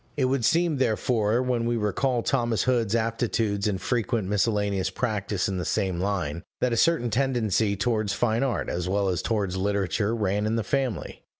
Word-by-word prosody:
It 135 - +2
would 130 -1 0
seem 165 +3 +2
therefore, 115 -1 +1
when 125 -2 0
we 120 0 +1
recall 115 +4 0
Thomas 120 -4 +1
Hood's 120 -4 +1
aptitudes 110 -2 0
and 100 -3 -1
frequent 115 -1 -1
miscellaneous 100 -2 0
practice 100 -2 -2
in 95 - -2
the - - -2
same 95 -2 -1
line, 90 -5 -2 0.2
that 125 -2 +1
a - - +2
certain 120 -3 +2
tendency 115 -4 +1
towards 110 0 0
fine 110 +3 +1
art, 135 -3 -1
as 90 +1 -2
well 100 0 +1
as 90 -3 -1
towards 100 -5 -1
literature, 100 +2 0
ran 105 -1 0
in 110 - 0
the 115 - 0
family. 130 -6 -2
110 Hz, 180 wpm, -26 LUFS, 100-120 Hz, 0.2 s, It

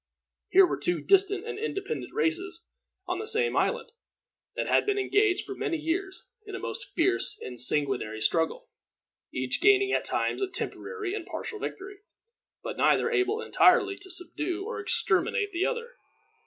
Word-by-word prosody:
Here 385 +1 +7
were - - -3
two 355 - 0
distinct 395 +2 +3
and 445 -3 -5
independent 425 -3 -4
races 355 -3 -1 0.4
on - - -2
the 435 - -5
same 460 +1 +2
island, - - 0 0.6
that - - -1
had - - +3
been 410 -1 0
engaged 405 -1 +2
for 395 - -5
many 340 -3 -2
years 375 +5 -3 0.2
in 415 -2 -8
a - - -5
most 465 +5 -6
fierce 375 +2 +1
and 125 -1 -5
sanguinary 125 -5 +1
struggle, 160 +9 +1 0.6
each 130 -1 -2
gaining 395 -1 +5
at - - +1
times - - 0
a 390 - +1
temporary 395 +2 -4
and 425 - -5
partial 425 - -6
victory, 390 0 -6 0.6
but - - -5
neither 465 - +3
able 420 +1 +1
entirely 390 -4 +4
to 385 -1 -11
subdue 355 +1 -3
or 465 - -4
exterminate 410 0 0
the 350 +1 0
other. 475 0 -4
390 Hz, 160 wpm, -28 LUFS, 345-420 Hz, 0.6 s, Here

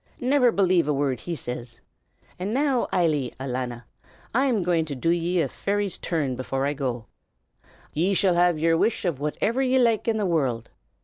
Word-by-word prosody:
Never 250 -1 +3
believe 185 -6 +2
a 150 - +2
word 135 -3 0
he 170 +4 -4
says! 120 -4 -7 0.6
And 190 +3 -2
now, 270 0 +1
Eily, 150 -8 +1
alanna, 125 -2 -4 0.5
I'm 245 -5 +2
going 170 -2 +2
to 145 -3 -5
do 165 +6 0
ye 175 +1 +1
a - - 0
fairy's 200 -2 -2
turn 145 -7 -1
before 135 +2 -2
I 145 - 0
go. 125 -5 -3 0.9
Ye 180 +6 +1
shall 185 -1 +3
have 175 -1 +3
yer 165 +1 +2
wish 210 +5 0
of 165 -7 -1
whatever 205 - -1
ye 260 0 +2
like 235 -4 +2
in 225 -1 +2
the 210 - 0
world. 135 -10 -1
170 Hz, 180 wpm, -25 LUFS, 135-205 Hz, 0.9 s, Never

